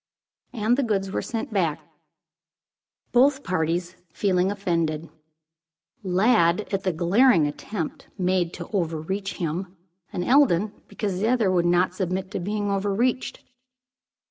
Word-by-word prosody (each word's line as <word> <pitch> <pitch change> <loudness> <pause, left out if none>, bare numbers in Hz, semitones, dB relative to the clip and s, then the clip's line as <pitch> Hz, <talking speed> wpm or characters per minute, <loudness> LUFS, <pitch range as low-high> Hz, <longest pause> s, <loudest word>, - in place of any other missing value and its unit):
And 230 +1 +1
the - - +2
goods 195 -6 -1
were - - -1
sent 225 -1 -4
back, 170 -7 +1 1.3
both 270 +3 +4
parties 175 0 -1 0.2
feeling 185 +1 +1
offended; 165 -5 -1 0.9
Lladd 190 -1 +3
at 195 - +1
the 190 - 0
glaring 180 - +4
attempt 160 +4 -5
made 180 -2 +1
to 175 - -7
overreach 190 +2 -2
him, 180 +2 -4 0.3
and 175 - -2
Eldon 215 -7 +4
because 195 -4 -3
the 215 - +1
other 230 -5 +2
would 175 -2 +2
not 175 +1 +2
submit 190 +1 -3
to - - -3
be 205 +4 -2
overreached. 205 +5 -1
190 Hz, 125 wpm, -24 LUFS, 175-210 Hz, 1.3 s, both